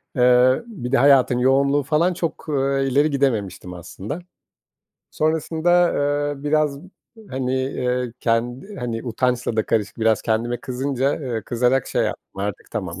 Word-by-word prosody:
Eee, 125 - +4
bir 145 - -6
de - - +4
hayatın 130 -1 +5
yoğunluğu 140 +2 +3
falan 160 +6 +2
çok, 170 -2 -4
eee, 135 -1 +1
ileri 145 +4 +3
gidememiştim 105 -10 -1
aslında. 95 - -7 0.9
Sonrasında, 160 +3 +2 0.4
eee, 140 - -13
biraz, 150 -1 +1 0.5
hani, 130 0 -2
eee, 125 -2 -1
kendi 120 - -1
hani, 120 -3 -4
utançla 125 -1 -1
da 110 - +1
karışık, 105 -1 -1
biraz 110 -1 +2
kendime 115 +2 0
kızınca, 135 +2 -1
eee, 120 -6 -3
kızarak 125 +4 +1
şey - - 0
yaptım - - -5
artık, 100 -2 -5
tamam, 95 -3 -4
130 Hz, 140 wpm, -22 LUFS, 120-140 Hz, 0.9 s, hayatın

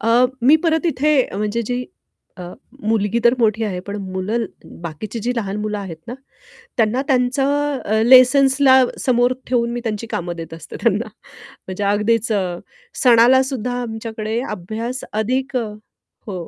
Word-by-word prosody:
अ, 225 - -1 0.3
मी 285 +5 +6
परत 320 +1 +1
इथे 300 -1 +1 0.2
म्हणजे 210 +3 -1
जी 245 0 -2 0.5
अ, 180 - -7 0.5
मुलगी 220 0 +1
तर 235 - +6
मोठी 225 -1 +1
आहे, 185 -4 -3
पण 200 +3 -7 0.2
मुलं 210 +5 -1 0.4
बाकीची 175 +7 -6
जी - - +1
लहान 200 -3 -2
मुलं 210 -1 -3
आहेत 185 -5 -7
ना 240 - -6 0.6
त्यांना 230 +2 +2
त्यांचं 275 +2 +1
अ, 220 +1 +1
लेसन्सला 265 +1 +6 0.2
समोर 245 0 +2
ठेवून 240 -2 +1
मी 240 - -3
त्यांची 225 0 -3
कामं 175 0 -3
देत 165 -1 -8
असते 165 -2 -10
त्यांना - - +1 0.4
म्हणजे 190 +2 -8
अगदीच 210 +3 +1 0.7
सणाला 245 +1 +6
सुद्धा 250 -2 -3
आमच्याकडे 220 -1 -4
अभ्यास 220 +6 -5
अधिक 255 +5 -1 0.7
हो. 180 -5 -5
230 Hz, 140 wpm, -19 LUFS, 210-255 Hz, 0.7 s, मी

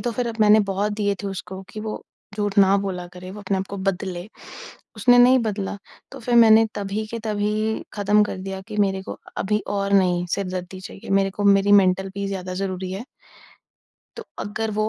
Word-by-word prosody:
तो 240 - -1
फिर 240 +1 -2
अब 230 - -4
मैंने 215 0 +6
बहुत 200 +2 0
दिए 205 -1 0
थे - - -3
उसको 190 0 -6
कि 215 - -6
वो 215 0 -5 0.3
झूठ 205 -1 -2
ना 195 0 +6
बोला 185 -3 -4
करें, 180 +1 -9
वो 205 +2 -9
अपने 195 -1 -1
आप 190 - -3
को 200 - -6
बदले, 190 -1 -3 0.7
उसने 245 +3 +5
नहीं 255 +1 +7
बदला। 205 -3 -2 0.4
तो - - -9
फिर 240 +1 -1
मैंने 225 -1 +7
तभी 205 +2 -3
के 230 +1 -5
तभी 215 +1 -1
ख़त्म 205 +1 +3
कर 210 - -5
दिया 190 0 -5
कि 210 - -6
मेरे 190 -1 +1
को - - -8 0.2
अभी 210 +2 +1
और 200 0 -1
नहीं 180 -2 +3
सिरदर्दी 185 -1 -5
चाहिए, 195 - -10
मेरे 195 0 +3
को 205 +2 -4
मेरी 200 0 +5
मेंटल 190 -1 +4
पीस 200 0 -3
ज़्यादा 185 -2 -4
ज़रूरी 185 -1 -3
है। 200 +5 -5 1.1
तो - - -7
अगर 220 +2 -3
वो 215 0 +2
200 Hz, 200 wpm, -23 LUFS, 190-215 Hz, 1.1 s, नहीं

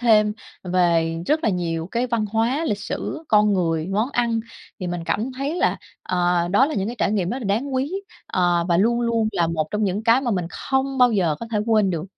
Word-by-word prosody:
thêm 215 -3 +4 0.3
về 170 -2 +2
rất 310 +1 +1
là 220 - +3
nhiều 165 -3 -2
cái 240 +2 0
văn 235 -3 0
hóa, 230 +9 0
lịch 205 -9 -1
sử, 315 - -5
con 210 -1 +4
người, 165 -3 0
món 215 +7 0
ăn. 235 -3 0 0.4
Thì 180 - -3
mình 175 -1 -4
cảm 215 +10 -1
thấy 275 +5 -3
là, - - +1 0.3
ờ, 175 -1 +1
đó 210 +9 +4
là 310 - -3
những 195 0 -1
cái 240 - -5
trải 205 - +1
nghiệm 190 -4 0
rất 255 - -2
là 245 - -7
đáng 240 +8 -1
quý, 270 +6 -1 0.3
ờ, 175 -2 +1
và 170 - +3
luôn 235 +6 +2
luôn 230 -2 +1
là 170 -3 +1
một 160 -2 -1
trong 210 0 0
những 200 +3 -1
cái 230 +3 +4
mà 245 -3 -1
mình 180 -4 -1
không 265 0 -1
bao 245 -2 +5
giờ 175 -7 +2
có 230 - -5
thể 210 - +1
quên 215 -4 +3
được. 165 -1 -3
210 Hz, 235 wpm, -22 LUFS, 175-240 Hz, 0.4 s, bao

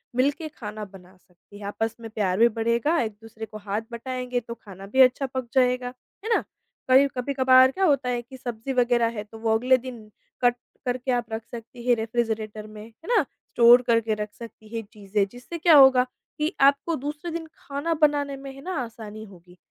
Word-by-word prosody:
मिलके 285 +5 +1
खाना 215 -7 -7
बना 190 -1 -16
सकती 180 +2 -19
हैं, 205 - -8
आपस 225 +2 -2
में 225 - -7
प्यार 195 -4 -1
भी 235 - +7
बढ़ेगा, 235 +8 +1
एक-दूसरे 220 0 -6
को 215 - -10
हाथ 205 0 -3
बटाएँगे 250 +1 -3
तो 235 - -4
खाना 195 -4 -12
भी 265 - +7
अच्छा 260 +2 +5
पक 260 -2 -3
जाएगा, 250 -1 +2 0.3
है 450 0 +2
ना? - - +1 0.5
कभी 265 +2 +6
कभी-कभार 260 0 +5
क्या 380 +3 0
होता 275 -5 +2
है 240 -1 -1
कि 260 +2 -13
सब्ज़ी 240 +1 -5
वगैरह 240 -2 +3
है 210 - -3
तो 220 +1 -13
वो 225 0 +1
अगले 255 +3 +4
दिन 255 0 -8 0.5
कट 245 -1 +4 0.3
करके 250 +1 -1
आप 245 -1 0
रख 220 - -3
सकती 235 +1 -9
हैं 245 - +5
रेफ़्रिजरेटर 220 -2 -3
में, 215 0 -10
है 230 +9 -18
ना, - - +6
स्टोर 240 +1 +4
करके 230 -1 +2
रख 210 0 -3
सकती 225 -2 -12
हैं 225 - -3
चीज़ें, 205 -1 -1
जिससे 245 +8 -8
क्या 335 -1 +5
होगा? 265 -2 +7 0.3
कि 305 +4 -1
आपको 280 +4 +4
दूसरे 295 +4 -5
दिन 325 -1 -5
खाना 285 +4 -3
बनाने 290 -2 +2
में 275 0 -8
है 275 - -12
ना 370 +4 -5
आसानी 220 -2 -9
होगी। 180 -3 -17
240 Hz, 200 wpm, -25 LUFS, 220-265 Hz, 0.5 s, भी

